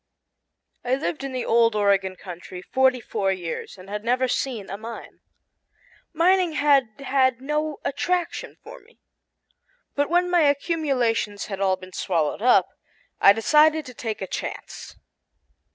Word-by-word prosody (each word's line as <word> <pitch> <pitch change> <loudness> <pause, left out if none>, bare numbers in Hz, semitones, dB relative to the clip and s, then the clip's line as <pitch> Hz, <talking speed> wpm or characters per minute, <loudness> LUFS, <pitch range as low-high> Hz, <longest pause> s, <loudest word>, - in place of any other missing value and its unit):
I 245 - -6
had 260 +2 +1
lived 300 -3 -3
in 275 - -4
the 255 -1 -3
old 230 -1 +3
Oregon 195 -2 +2
country 180 0 -9
forty 260 +1 +2
four 195 -4 -1
years 180 0 -5
and 185 +1 -13
had 210 +1 -5
never 250 +2 +1
seen 245 -5 -2
a - - -5
mine. 225 +3 -9 0.9
Mining 355 +1 +2
had 290 -3 +4 0.2
had 260 -2 +2
no 300 +2 -2
attraction 355 +5 -2
for - - -11
me. - - -25 1.0
But 285 0 0
when 355 +1 +2
my 350 -1 +4
accumulations 275 - 0
had 195 -2 -6
all 190 -1 +2
been 185 0 -13
swallowed 165 -2 -1
up, 250 +2 +4 0.5
I 195 - +8
decided 300 +8 +3
to 250 - -10
take 220 -4 -5
a - - -5
chance. - - -7
250 Hz, 150 wpm, -24 LUFS, 200-300 Hz, 1.0 s, I